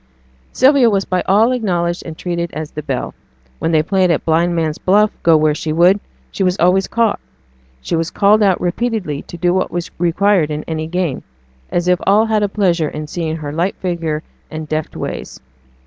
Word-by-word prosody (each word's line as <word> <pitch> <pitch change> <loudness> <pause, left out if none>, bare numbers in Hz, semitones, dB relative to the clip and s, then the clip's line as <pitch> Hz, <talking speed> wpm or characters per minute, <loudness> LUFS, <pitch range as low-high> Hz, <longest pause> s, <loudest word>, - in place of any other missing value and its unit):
Sylvia 265 -2 +4
was 195 -2 0
by 185 -1 0
all 215 +5 +4
acknowledged 175 -8 -1
and 160 -1 -7
treated 170 -1 -3
as 155 -1 -5
the 150 - -5
belle. 135 -4 -4 0.5
When 165 - -1
they 155 -1 +3
played 185 +2 +2
at 170 - 0
blind 170 +2 +2
man's 160 -2 -1
buff 210 +3 +3
go 165 -2 +5
where 155 -1 +2
she 155 +1 -4
would, 175 +5 +4 0.3
she - - -6
was 185 0 +2
always 185 +2 +3
caught; 230 -2 +1 0.6
she 65 - -2
was 165 0 -1
called 210 +2 +3
out 195 -3 +3
repeatedly 180 -5 -2
to 175 - -10
do 175 +1 +1
what 185 0 0
was 175 -1 -4
required 175 -1 +2
in 150 0 -4
any 155 -1 -4
game, 175 -5 -2 0.5
as 175 0 -1
if 180 -1 +3
all 210 +3 +5
had 220 -1 +1
a 205 - +1
pleasure 175 -6 +1
in 150 0 -6
seeing 160 0 -3
her 150 -2 -6
light 175 +5 -1
figure 165 -4 -3 0.3
and 155 -1 -6
deft 155 0 -3
ways. - - -6
175 Hz, 195 wpm, -17 LUFS, 160-195 Hz, 0.6 s, go